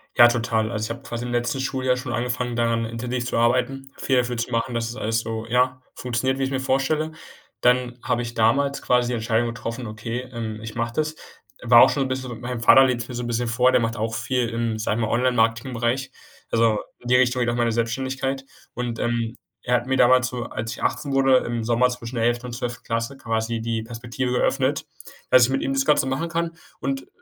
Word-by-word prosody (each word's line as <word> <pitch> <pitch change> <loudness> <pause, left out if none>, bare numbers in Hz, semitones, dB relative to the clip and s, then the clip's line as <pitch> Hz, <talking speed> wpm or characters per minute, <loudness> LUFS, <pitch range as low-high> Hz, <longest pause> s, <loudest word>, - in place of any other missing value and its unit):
Ja, 120 - +9
total. 115 -2 0
Also 110 -1 -2
ich - - -6
habe - - -15
quasi 120 +1 -4
im 120 - -4
letzten 120 +3 -1
Schuljahr 130 -1 0
schon 125 -2 -4
angefangen, 125 0 -2
daran 115 -1 +1
intensiv 120 +2 -3
zu 125 - -2
arbeiten, 130 +3 +1
viel 130 -2 +1
dafür 120 -1 0
zu 120 +2 -3
machen, 115 +1 -1
dass 115 0 -1
das - - -8
alles 115 +1 +1
so, 115 0 -5
ja, 125 +2 +1
funktioniert, 130 +2 -1
wie 135 - -1
ich's 135 - -1
mir 135 - 0
vorstelle. 135 +4 0 0.5
Dann 125 0 +2
habe 120 - 0
ich 120 0 -6
damals 140 +5 +2
quasi 125 -1 +3
die 125 - -2
Entscheidung 115 +1 +1
getroffen, 115 0 -5
okay, 110 +3 -4
ähm, 110 -2 -5
ich 110 0 -8
mache 115 0 -2
das. 155 +1 -1 0.5
War 120 -1 +7
auch - - +8
schon 140 - 0
'n 130 - -2
bisschen 130 -3 -4
mein 125 -1 -4
Vater 130 +3 +7
lebt's 120 -2 -1
mir 125 - -7
so 120 - -3
'n - - -4
bisschen 120 +1 -1
vor, 125 +2 +3
der 120 - +3
macht 115 0 -1
auch 110 +1 -2
viel 120 +1 -1
im, 115 -1 -2
sage 110 +1 -1
ich - - 0
mal, - - -3
Online-Marketingbereich. 120 +1 +1 0.4
Also 115 -2 +3 0.2
in 125 - -11
die 125 - +4
Richtung 125 0 +3
geht 120 -1 +1
auch 120 - 0
meine 120 -1 +1
Selbstständigkeit 135 +4 -2 0.3
und, 120 -2 -3
ähm, 115 -1 -1 0.3
er 125 - +2
hat 125 +1 -1
mir 130 - +1
damals 130 0 +5
so, 125 -1 -4
als 110 +1 -5
ich - - -8
18 140 -2 -1
wurde, 135 -1 +5
im 120 -2 -2
Sommer 120 +2 +3
zwischen 125 -1 -6
der 115 - +1
11. 120 +1 0
und 125 - -6
12. 120 0 -5
Klasse 115 +4 -2
quasi 115 -2 -2
die 115 -1 -2
Perspektive 120 +2 -3
eröffnet, 135 +1 +1 0.5
dass 125 -2 +8
ich - - -2
mit 135 0 0
ihm 135 - -1
das 135 0 +1
Ganze 150 - +4
machen 135 +5 -1
kann 170 0 -1 0.3
und 135 -1 -3
120 Hz, 230 wpm, -23 LUFS, 115-130 Hz, 0.5 s, Ja